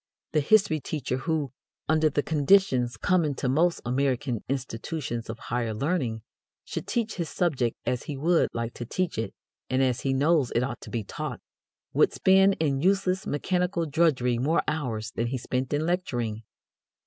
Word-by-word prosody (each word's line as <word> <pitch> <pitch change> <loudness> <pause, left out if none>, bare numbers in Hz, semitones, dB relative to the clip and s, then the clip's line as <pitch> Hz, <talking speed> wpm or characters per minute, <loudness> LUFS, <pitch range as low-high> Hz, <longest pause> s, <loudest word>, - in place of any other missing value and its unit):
The 155 - +3
history 165 0 +4
teacher 140 -3 -3
who, 150 -1 -1 0.4
under 155 0 +3
the 145 0 0
conditions 145 -6 +3
common 165 -6 +1
to 130 - -2
most 165 +7 +2
American 130 -1 0
institutions 130 -1 -3
of 115 - -4
higher 115 -1 -2
learning, 125 -5 -1 0.4
should - - -5
teach 225 -3 -1
his 170 -3 -2
subject 135 -10 0
as 125 - -1
he 145 - -5
would 165 +4 +3
like 115 0 -3
to - - -6
teach 185 -7 -1
it 115 - -2 0.4
and 130 +1 +2
as 125 -1 +1
he 135 - 0
knows 140 0 +3
it 120 - +3
ought 135 - -4
to - - -9
be 115 -3 -2
taught, - - -5 0.5
would - - +4
spend 195 +1 +4
in 140 -4 +1
useless 190 +1 +1
mechanical 180 +3 0
drudgery 140 -6 +2
more 150 +7 +2
hours 115 -8 -2
than 115 0 -2
he 130 +2 -2
spent 130 +1 -2
in 150 +1 0
lecturing. 120 -12 -1
140 Hz, 170 wpm, -27 LUFS, 125-165 Hz, 0.5 s, history